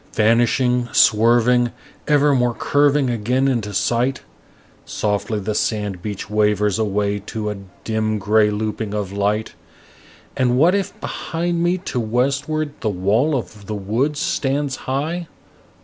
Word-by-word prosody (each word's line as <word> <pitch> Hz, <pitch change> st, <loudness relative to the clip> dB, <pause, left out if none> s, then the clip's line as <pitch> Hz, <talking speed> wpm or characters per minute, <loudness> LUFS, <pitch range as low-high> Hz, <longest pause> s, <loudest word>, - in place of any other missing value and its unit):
Vanishing, 120 Hz, +2 st, +2 dB
swerving, 120 Hz, +2 st, +4 dB, 0.4 s
evermore 140 Hz, -5 st, +3 dB
curving 145 Hz, -2 st, +2 dB
again 125 Hz, +4 st, 0 dB
into 115 Hz, -6 st, -1 dB
sight, 120 Hz, +6 st, 0 dB, 0.6 s
Softly 105 Hz, +1 st, -2 dB
the 105 Hz, +2 st, -3 dB
sand 105 Hz, -4 st, -2 dB
beach 105 Hz, 0 st, -5 dB
wavers 105 Hz, 0 st, +1 dB
away 105 Hz, -1 st, 0 dB
to 105 Hz, -1 st, -3 dB
a 105 Hz, -, -6 dB, 0.3 s
dim 110 Hz, -1 st, -1 dB
gray 105 Hz, +1 st, +3 dB
looping 105 Hz, 0 st, -3 dB
of 100 Hz, -3 st, -3 dB
light. 105 Hz, +2 st, -1 dB, 0.8 s
And 125 Hz, -1 st, +2 dB
what 165 Hz, +7 st, +5 dB
if 200 Hz, -2 st, -2 dB
behind 170 Hz, +1 st, -2 dB
me 175 Hz, +2 st, +2 dB
to 175 Hz, -8 st, -4 dB
westward 140 Hz, +6 st, -1 dB
the 110 Hz, -, -1 dB
wall 105 Hz, +10 st, +1 dB
of 105 Hz, -4 st, -8 dB
the 110 Hz, -, -3 dB
woods 120 Hz, +10 st, -1 dB
stands 140 Hz, -1 st, -1 dB
high? 160 Hz, +6 st, -2 dB
115 Hz, 130 wpm, -20 LUFS, 105-135 Hz, 0.8 s, what